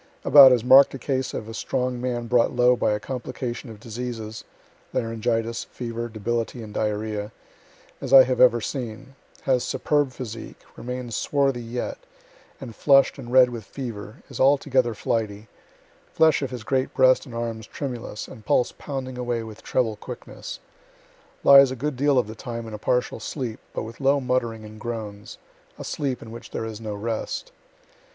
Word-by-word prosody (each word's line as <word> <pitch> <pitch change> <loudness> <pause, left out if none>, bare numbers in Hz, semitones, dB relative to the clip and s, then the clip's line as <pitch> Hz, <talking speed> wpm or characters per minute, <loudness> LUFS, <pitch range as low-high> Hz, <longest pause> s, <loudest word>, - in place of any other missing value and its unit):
About 140 -3 +10
as 120 -3 +3
mark'd 135 +2 +7
a - - -4
case 130 0 -2
of 110 - -5
a 115 - -7
strong 125 +1 -2
man 120 -2 -2
brought 120 +1 +2
low 125 0 +5
by 115 - +1
a 105 - -1
complication 125 +1 -5
of 110 -2 -10
diseases, 115 -1 -6 0.5
(laryngitis, 115 0 -1
fever, 120 -1 -5
debility 115 +2 -3
and 105 -1 -10
diarrhoea,) 105 0 -2 0.7
as 135 - -5
I 135 -1 +10
have 130 0 0
ever 120 -2 +6
seen 130 +1 -5 0.3
has 130 -2 +2
superb 145 -1 0
physique, 115 -3 -8 0.2
remains 125 -2 -5
swarthy 135 -4 +1
yet, 120 +1 -4 0.6
and 120 -5 -9
flushed 135 -1 +4
and 120 -2 -8
red 125 -1 +6
with 115 -2 -6
fever 115 -1 -8
is 135 - -9
altogether 130 -3 +3
flighty 105 -1 -2 0.6
flesh 160 -3 +4
of 135 - -2
his 125 -3 -7
great 130 +3 -1
breast 130 -1 +4
and 120 - -9
arms 115 -2 -4
tremulous, 120 -6 -6
and 110 - -12
pulse 125 - +2
pounding 130 -3 -5
away 120 -2 -2
with 110 -1 -10
treble 115 -4 0
quickness - - -8 0.8
lies 140 -1 +8
a 130 - -4
good 145 +3 -3
deal 140 +1 +2
of 125 - +3
the 110 - -8
time 115 0 -6
in 110 - -8
a 105 - -6
partial 125 +1 0
sleep, 120 -1 -5
but - - -4
with 115 +4 -9
low 140 +1 +3
muttering 120 -4 -1
and 110 0 -11
groans 105 -3 -6 0.4
a - - -7
sleep 135 -4 -3
in 115 - -10
which 115 0 -10
there - - -4
is 110 0 -7
no 105 -2 -4
rest. 115 - -4
120 Hz, 175 wpm, -24 LUFS, 110-130 Hz, 0.8 s, About